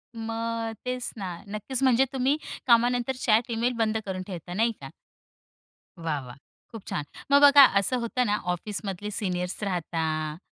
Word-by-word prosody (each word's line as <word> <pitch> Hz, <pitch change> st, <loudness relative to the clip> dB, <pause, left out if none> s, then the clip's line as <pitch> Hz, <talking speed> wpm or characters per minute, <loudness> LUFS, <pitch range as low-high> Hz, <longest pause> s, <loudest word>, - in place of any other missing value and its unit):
मग 225 Hz, 0 st, -3 dB
तेच 250 Hz, -1 st, -2 dB
ना. 185 Hz, -3 st, -5 dB
नक्कीच 215 Hz, +6 st, -2 dB
म्हणजे 260 Hz, 0 st, +4 dB
तुम्ही 270 Hz, +3 st, +1 dB, 0.3 s
कामानंतर 245 Hz, +2 st, +3 dB
चॅट 230 Hz, +1 st, +3 dB
ईमेल 235 Hz, +2 st, 0 dB
बंद 220 Hz, -1 st, +1 dB
करून 190 Hz, -1 st, -4 dB
ठेवता, 175 Hz, -2 st, -7 dB
नाही 225 Hz, +4 st, +2 dB
का? 135 Hz, -, -8 dB, 1.1 s
वाह, 160 Hz, -3 st, -2 dB
वाह! 125 Hz, 0 st, -10 dB, 0.4 s
खूप 225 Hz, -4 st, -10 dB
छान. 145 Hz, -, -2 dB, 0.3 s
मग 280 Hz, -, +6 dB
बघा 285 Hz, -1 st, +9 dB, 0.2 s
असं 255 Hz, +6 st, +1 dB
होतं 250 Hz, +2 st, 0 dB
ना, 210 Hz, -2 st, +1 dB, 0.2 s
ऑफिसमधले 205 Hz, +1 st, -4 dB
सीनियर्स 180 Hz, -2 st, -2 dB
राहता 160 Hz, -4 st, -2 dB
220 Hz, 150 wpm, -26 LUFS, 180-245 Hz, 1.1 s, बघा